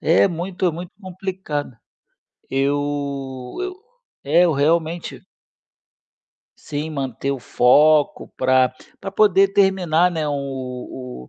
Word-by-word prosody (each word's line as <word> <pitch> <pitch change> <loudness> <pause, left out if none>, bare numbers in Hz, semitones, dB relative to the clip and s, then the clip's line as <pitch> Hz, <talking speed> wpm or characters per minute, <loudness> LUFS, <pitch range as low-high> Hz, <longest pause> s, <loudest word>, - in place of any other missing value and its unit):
é 165 +5 +4
muito, 180 +2 -3
é - - +3
muito 175 +2 -8
complicado. 185 - -5 0.7
Eu 140 +2 +1 0.8
eu 370 0 -6 0.5
é, 160 +5 +4
eu 170 - +3
realmente 160 +3 0 1.4
Sim, 150 +1 -5
manter 135 -2 -3
o 135 - -4
foco 145 +5 +3
pra 130 0 +3 0.3
pra 195 - -7
poder 195 -1 +4
terminar, 185 -4 +3
né, 160 -3 -2
o 130 - -6
155 Hz, 105 wpm, -21 LUFS, 135-180 Hz, 1.4 s, é